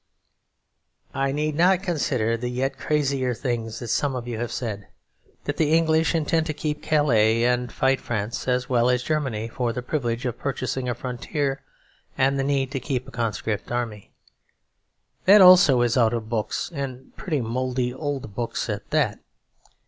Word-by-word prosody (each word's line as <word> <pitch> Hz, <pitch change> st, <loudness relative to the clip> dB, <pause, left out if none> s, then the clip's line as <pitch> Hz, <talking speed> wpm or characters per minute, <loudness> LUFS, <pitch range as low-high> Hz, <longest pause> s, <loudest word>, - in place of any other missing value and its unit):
I 135 Hz, 0 st, 0 dB
need 150 Hz, +2 st, -1 dB
not 180 Hz, +3 st, +3 dB
consider 130 Hz, -, 0 dB
the 120 Hz, +1 st, -3 dB
yet 135 Hz, +2 st, -1 dB
crazier 135 Hz, -4 st, 0 dB
things 115 Hz, -3 st, -3 dB
that 120 Hz, -, -6 dB
some 135 Hz, +4 st, 0 dB
of 120 Hz, -1 st, -5 dB
you 115 Hz, -2 st, -4 dB
have 120 Hz, 0 st, -3 dB
said; 105 Hz, -5 st, -4 dB, 0.4 s
as -, -, -32 dB
that 145 Hz, -, -3 dB
the 155 Hz, -1 st, +2 dB
English 160 Hz, 0 st, +3 dB
intend 160 Hz, +1 st, +1 dB
to 155 Hz, -, -3 dB
keep 150 Hz, 0 st, -3 dB
Calais 115 Hz, -7 st, +3 dB
and 125 Hz, -1 st, +1 dB
fight 135 Hz, 0 st, +1 dB
France 115 Hz, +2 st, -3 dB
as 125 Hz, 0 st, +1 dB
well 120 Hz, -1 st, +2 dB
as 125 Hz, 0 st, +1 dB
Germany 130 Hz, -8 st, -1 dB
for 120 Hz, 0 st, -2 dB
the 125 Hz, +1 st, -5 dB
privilege 125 Hz, -3 st, -2 dB
of 125 Hz, -, -3 dB
purchasing 130 Hz, -2 st, -2 dB
a 120 Hz, -, -1 dB
frontier 135 Hz, +3 st, -3 dB, 0.6 s
and 135 Hz, +1 st, +2 dB
the -, -, +1 dB
need 135 Hz, -1 st, 0 dB
to 135 Hz, -, -2 dB
keep 130 Hz, -1 st, -3 dB
a -, -, -10 dB
conscript 110 Hz, -2 st, -3 dB
army. 115 Hz, -4 st, -3 dB, 1.2 s
That, 205 Hz, +3 st, +8 dB
also, 180 Hz, -9 st, +8 dB
is 120 Hz, +1 st, +1 dB
out 120 Hz, -2 st, +3 dB
of 110 Hz, -1 st, -5 dB
books, 110 Hz, +6 st, -2 dB
and 135 Hz, -3 st, -6 dB
pretty 155 Hz, -6 st, -2 dB
mouldy 125 Hz, +1 st, -1 dB
old 135 Hz, -6 st, -4 dB
books 120 Hz, +2 st, -3 dB
at -, -, -6 dB
that. -, -, +1 dB
130 Hz, 170 wpm, -24 LUFS, 120-145 Hz, 1.2 s, That